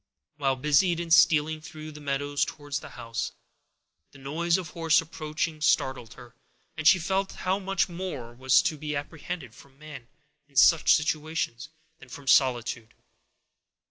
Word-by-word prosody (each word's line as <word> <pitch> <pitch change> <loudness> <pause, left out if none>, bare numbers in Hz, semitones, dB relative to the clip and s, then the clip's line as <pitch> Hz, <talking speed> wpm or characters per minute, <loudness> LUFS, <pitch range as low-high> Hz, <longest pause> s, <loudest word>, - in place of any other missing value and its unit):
While 135 -3 +1
busied 150 +6 +2
in 170 -1 -5
stealing 160 -2 +4
through 155 0 -9
the 150 0 -12
meadows 145 0 -1
towards 145 -1 -4
the 155 - -11
house, 115 0 -4 0.8
the - - -14
noise 165 +6 0
of 180 -3 -6
horse 165 -1 +3
approaching 155 -1 -4
startled 130 -6 0
her, 120 -2 -14 0.4
and 155 -1 0
she 190 - +8
felt 190 +3 -1
how 190 +2 -1
much 195 0 0
more 170 -10 -6
was 130 +2 +3
to 155 - -2
be 150 0 -4
apprehended 145 -2 -6
from 135 +2 -18
man, 145 -5 -11 0.4
in 140 - -29
some 155 +4 +5
situations, 155 -4 0 0.3
than - - -15
from 140 - -10
solitude. 125 -5 +2
150 Hz, 150 wpm, -27 LUFS, 135-165 Hz, 0.8 s, she